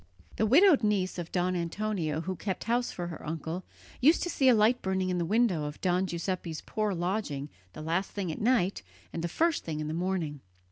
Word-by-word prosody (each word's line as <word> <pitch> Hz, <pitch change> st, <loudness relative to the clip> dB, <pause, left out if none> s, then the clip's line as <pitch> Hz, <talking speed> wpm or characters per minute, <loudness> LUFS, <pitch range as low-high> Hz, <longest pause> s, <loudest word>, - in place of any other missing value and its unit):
The 220 Hz, -, +2 dB
widowed 320 Hz, -, +6 dB
niece 200 Hz, -4 st, 0 dB
of 170 Hz, -1 st, -6 dB
Don 180 Hz, 0 st, +1 dB
Antonio 170 Hz, -3 st, -2 dB
who 185 Hz, +2 st, -3 dB
kept 190 Hz, 0 st, -3 dB
house 240 Hz, +1 st, +1 dB
for 175 Hz, -, -5 dB
her 165 Hz, -, -8 dB
uncle 160 Hz, +3 st, -4 dB, 0.4 s
used 300 Hz, +6 st, +5 dB
to 350 Hz, -, -2 dB
see 265 Hz, -2 st, +4 dB
a 245 Hz, -, +7 dB
light 225 Hz, +4 st, +3 dB
burning 190 Hz, -1 st, 0 dB
in 180 Hz, -, 0 dB
the 170 Hz, -, 0 dB
window 200 Hz, -5 st, +2 dB
of 150 Hz, 0 st, -6 dB
Don 185 Hz, +1 st, +1 dB
Giuseppe's 170 Hz, -2 st, -3 dB
poor 215 Hz, -3 st, -1 dB
lodging 175 Hz, -6 st, -2 dB, 0.2 s
the 155 Hz, -, -8 dB
last 170 Hz, +5 st, 0 dB
thing 190 Hz, -5 st, -3 dB
at -, -, -6 dB
night 210 Hz, -5 st, +2 dB, 0.3 s
and 165 Hz, -, -3 dB
the -, -, 0 dB
first 325 Hz, -, +1 dB
thing 155 Hz, -2 st, -4 dB
in 155 Hz, -, -3 dB
the 155 Hz, -, -3 dB
morning. 170 Hz, -5 st, -2 dB
185 Hz, 215 wpm, -29 LUFS, 165-215 Hz, 0.4 s, a